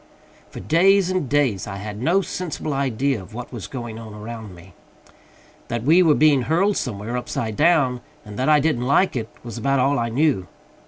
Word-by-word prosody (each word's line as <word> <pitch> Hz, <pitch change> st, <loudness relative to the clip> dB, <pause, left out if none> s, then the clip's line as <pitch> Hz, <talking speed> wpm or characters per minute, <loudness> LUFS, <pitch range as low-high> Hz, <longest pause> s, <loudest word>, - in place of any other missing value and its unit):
For -, -, -9 dB
days 185 Hz, +3 st, +3 dB
and 185 Hz, -8 st, -1 dB
days 135 Hz, -9 st, +1 dB
I 100 Hz, -, -5 dB
had 105 Hz, +2 st, -7 dB
no 175 Hz, +9 st, +3 dB
sensible 170 Hz, -5 st, -4 dB
idea 135 Hz, -2 st, 0 dB
of 100 Hz, +4 st, -13 dB
what 125 Hz, +2 st, -7 dB
was 115 Hz, -5 st, -6 dB
going 120 Hz, -4 st, -7 dB
on 110 Hz, -2 st, -10 dB
around 110 Hz, -2 st, -8 dB
me. 90 Hz, +2 st, -16 dB, 0.9 s
That 120 Hz, -1 st, -3 dB
we 165 Hz, +7 st, +5 dB
were 160 Hz, -4 st, +4 dB
being 150 Hz, -3 st, +4 dB
hurled 180 Hz, -, +1 dB
somewhere 110 Hz, -1 st, -4 dB
upside 115 Hz, -3 st, -3 dB
down, 145 Hz, -6 st, +2 dB, 0.2 s
and 105 Hz, -, -9 dB
that 130 Hz, -, +1 dB
I 150 Hz, -1 st, +6 dB
didn't 140 Hz, -5 st, 0 dB
like 160 Hz, +6 st, +3 dB
it, 115 Hz, -2 st, -3 dB
was 120 Hz, -3 st, -7 dB
about 135 Hz, 0 st, +1 dB
all 135 Hz, +1 st, +2 dB
I 115 Hz, 0 st, -1 dB
knew. 125 Hz, -, +1 dB
130 Hz, 195 wpm, -22 LUFS, 110-155 Hz, 0.9 s, I